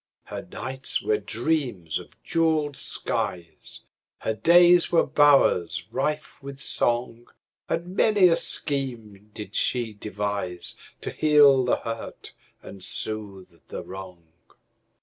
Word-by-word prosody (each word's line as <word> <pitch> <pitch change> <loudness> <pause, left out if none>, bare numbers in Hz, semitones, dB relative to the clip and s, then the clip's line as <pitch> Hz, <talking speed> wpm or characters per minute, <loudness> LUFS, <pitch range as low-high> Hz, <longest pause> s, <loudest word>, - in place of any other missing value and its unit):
Her - - -7
nights 130 +3 -3
were 105 -1 +1
dreams 115 - -1
of - - -14
jeweled 160 -3 +1
skies, 85 -9 -4 0.4
Her 110 - -1
days 175 +7 +5
were 170 - +4
bowers 140 - +3
rife 150 0 -3
with 140 0 -9
song, 120 -2 0 0.4
And 175 +3 -3
many 205 -4 +5
a 165 - +4
scheme 115 -11 -3
did 105 -2 -8
she 120 -3 0
deviseTo 100 -4 -5
heal 145 -3 +5
the 125 - +2
hurt 115 0 -7 0.3
and 95 -2 -10
soothe 95 -4 -5
the - - -6
wrong. 95 -2 -10
120 Hz, 110 wpm, -25 LUFS, 100-150 Hz, 0.4 s, days